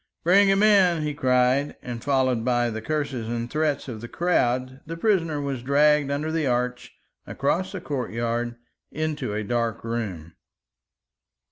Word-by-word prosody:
"Bring 195 +4 +5
him 195 +1 +3
in!" 185 -6 +4
he 150 -1 -2
cried; 130 +1 +2
and 120 -2 -6
followed 130 -4 +1
by 120 -1 +1
the 110 0 -5
curses 140 -3 -2
and 120 0 -3
threats 155 -2 0
of 115 -4 -6
the 120 - -6
crowd, 130 -5 0
the 165 +1 -5
prisoner 165 -6 +1
was 140 -3 -3
dragged 145 +2 +3
under 145 +3 -2
the 160 -3 0
arch 125 0 -2 0.3
across 180 +8 -1
a - - -3
courtyard 120 -4 -2 0.4
into 155 -9 -3
a 110 - -2
dark 115 0 -2
room. 100 -9 -4
130 Hz, 150 wpm, -25 LUFS, 120-155 Hz, 0.4 s, Bring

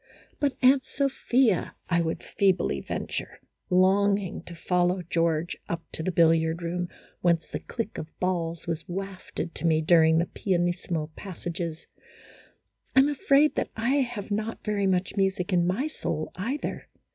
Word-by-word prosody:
"But, 285 -2 0
Aunt 260 +1 +6
Sophia," 260 - +1
I 170 -1 +2
would 165 0 -2
feebly 190 -2 +1
venture, - - -4 0.3
longing 195 +1 +3
to 175 - -9
follow 180 +2 +1
George 165 0 0
up 165 -1 -3
to - - -4
the 185 - -1
billiard 165 0 +3
room, 175 +1 -2 0.3
whence 170 -2 +2
the - - -4
click 230 -2 -5
of 155 - -5
balls 170 -3 -1
was 165 0 -4
wafted 185 -2 -5
to 170 - -1
me 160 -1 +4
during 160 0 +5
the 170 - +3
pianissimo 175 -4 -1
passages, 170 -3 -5 0.6
" - - -36
I 265 - +9
'm 280 - +3
afraid 285 +1 +4
that - - 0
I 235 +6 +1
have 235 -6 -2
not 215 +2 -2
very 205 -2 0
much 185 +2 0
music 190 -1 +1
in 175 -1 +3
my 200 +10 0
soul, 155 - -3
either." 245 +11 -4
180 Hz, 155 wpm, -27 LUFS, 170-205 Hz, 0.6 s, I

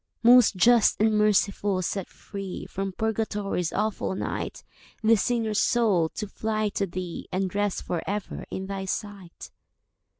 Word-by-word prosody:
"Most 245 -2 +7
Just 235 +4 +4
and 220 +1 +3
Merciful, 205 -2 +2
set 195 +1 -3
free 195 -2 -7
From 195 0 -4
Purgatory's 210 -4 -2
awful 210 -2 -1
night - - -4 0.4
This 220 -2 +5
sinner's 225 -3 0
soul, 205 -9 +2
to 210 - -4
fly 215 +1 -1
to 200 0 -2
Thee, 175 -1 -6
And 185 -1 -1
rest 205 -1 -1
for 170 -2 -2
ever 205 0 -4
in 190 - -4
Thy 195 0 -4
sight." 195 -3 -6
205 Hz, 140 wpm, -26 LUFS, 190-220 Hz, 0.4 s, Most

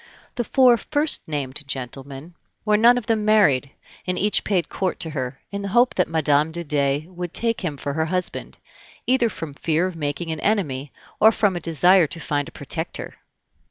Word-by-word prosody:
The 240 - -2
four 250 0 +4
first 290 +7 +1
named 145 -2 -2
gentlemen 135 +4 -6 0.3
were 210 -1 +3
none 235 +3 +5
of 245 - -3
them 220 -2 0
married, 200 -12 +3 0.4
and 180 - -1
each 210 +1 +1
paid 185 -4 0
court 185 -2 -3
to 165 -3 -2
her, 130 -2 -4
in 200 0 -4
the 200 - -4
hope 240 +5 +3
that 180 - +1
Mme. 155 -1 +2
de 170 +1 -4
Dey 145 -1 0
would 180 -1 -7
take 230 -1 +1
him 160 -7 -3
for 140 +1 -4
her 160 +2 0
husband, 180 +2 -3 0.5
either 250 -2 +2
from 160 -8 -7
fear 160 +4 0
of 185 -2 -4
making 150 +1 -3
an 160 - -4
enemy 150 -11 -1 0.3
or 220 - +7
from 205 -4 +1
a - - -2
desire 170 +2 +4
to 165 - -8
find 145 -2 -2
a - - -10
protector. 160 +4 -5
170 Hz, 195 wpm, -22 LUFS, 145-210 Hz, 0.5 s, or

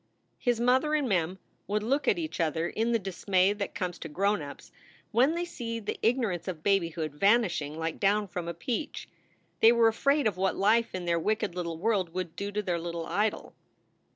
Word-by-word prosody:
His 245 -3 +1
mother 260 +6 +3
and 290 -3 +1
Mem 180 -3 0 0.3
would 210 +1 -1
look 275 +6 0
at 445 -5 +4
each 320 -2 -4
other 165 0 0
in 225 +5 -1
the 230 - +3
dis 195 -3 -8
may 190 0 +4
that 205 -1 -5
comes 180 -4 -3
to 160 - -7
grown 200 +4 +1
ups 140 -1 -10 0.4
when 260 +8 +3
they 345 +1 -1
see 230 -9 -5
the 210 - -5
ignorance 225 -7 0
of 165 -4 -5
babyhood 170 -5 +1
vanishing 175 -4 +2
like 165 0 -3
down 205 +1 +2
from 175 -2 -5
a 170 - -3
peach. 245 - -4 0.5
They 225 - +7
were 235 -1 +5
afraid 280 +6 +2
of 205 -4 +1
what 190 0 +1
life 220 +3 +2
in 180 -1 -4
their 170 -1 +1
wicked 210 0 -1
little 170 -2 -4
world 185 -3 0
would 180 -3 -4
do 200 +1 -4
to 210 +1 -2
their 175 -3 -1
little 170 0 -4
idol. 210 +1 -1
200 Hz, 205 wpm, -29 LUFS, 170-230 Hz, 0.5 s, They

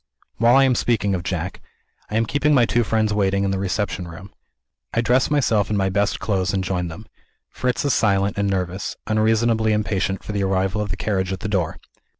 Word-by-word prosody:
While 120 +2 +5
I 135 - +6
am 130 -1 +4
speaking 110 -4 +1
of 90 - -1
Jack, 90 +1 -4 0.5
I 105 - -1
am 115 - +2
keeping 145 +5 +2
my 120 -3 +5
two 120 +1 +1
friends 110 -1 +1
waiting 100 -1 +1
in 100 - 0
the 95 - -1
reception 95 -2 -2
room. 90 +4 -11 0.6
I 115 - +3
dress 125 +2 +2
myself 115 -9 +2
in 105 - 0
my 95 -1 +1
best 100 +2 0
clothes 100 -2 0
and 95 - 0
join 90 -2 -2
them. 85 +7 -9 0.5
Fritz 125 +2 -1
is 140 - +2
silent 100 -2 +2
and 100 -1 0
nervous; 95 0 -3
unreasonably 110 +1 +2
impatient 100 -2 -1
for - - -5
the 100 -1 -1
arrival 95 +1 0
of 105 - -3
the 95 - -3
carriage 95 -3 -1
at 95 - -4
the 105 - -3
door. 90 -6 -1
100 Hz, 210 wpm, -22 LUFS, 95-110 Hz, 0.6 s, I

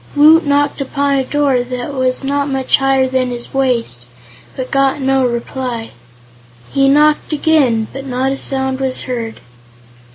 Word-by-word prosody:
Woot 310 +2 +6
knocked 285 0 +1
upon 280 +1 -1
a 270 -1 +1
door 275 -2 +1
that 250 +2 -5
was 255 0 -1
not 280 +1 -1
much 265 -1 +2
higher 270 -1 +2
than 255 -1 0
his 240 -1 -7
waist, 235 - 0 0.5
but 255 -1 -5
got 275 +1 +2
no 265 -1 +2
reply. 235 -1 -4 0.8
He 275 0 +3
knocked 300 +3 +3
again, 285 -7 +2
but 270 0 -7
not 260 +1 -1
a 275 - -2
sound 265 -1 -2
was 265 -1 -2
heard. 230 -3 -5
265 Hz, 155 wpm, -16 LUFS, 255-280 Hz, 0.8 s, Woot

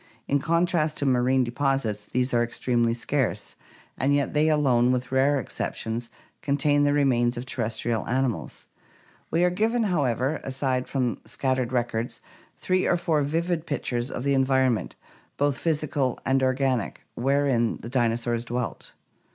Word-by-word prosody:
In 140 - +2
contrast 165 0 +1
to 145 - -1
marine 130 0 +3
deposits 120 -5 -1
these 125 +1 -1
are 120 0 +3
extremely 120 -1 0
scarce, 130 +1 -2 0.4
and 140 +2 +3
yet 140 -1 0
they 155 +1 +3
alone, 130 -5 +3
with 125 0 -2
rare 135 +2 +3
exceptions, 115 0 -4 0.3
contain 145 0 +2
the 145 0 +3
remains 125 -4 +2
of 120 - -4
terrestrial 115 -2 -2
animals. 130 -2 -2 0.6
We 170 - +2
are 180 - +3
given, 225 +5 +1
however, 140 - 0
aside 130 -1 -1
from 125 -4 -1
scattered 130 -2 -1
records, 120 -2 -2 0.4
three 185 0 +1
or 175 - +3
four 160 -3 +1
vivid 165 +3 -1
pictures 125 -3 -2
of 125 - -4
the 140 0 +2
environ 130 -1 +3
ment, 105 -6 -4 0.4
both 145 -1 +1
physical 150 -5 0
and 135 0 +2
organic, 130 -3 0
wherein 135 -2 +1
the 115 - -9
dinosaurs 120 -1 0
dwelt. 120 0 -4
130 Hz, 145 wpm, -25 LUFS, 120-145 Hz, 0.6 s, marine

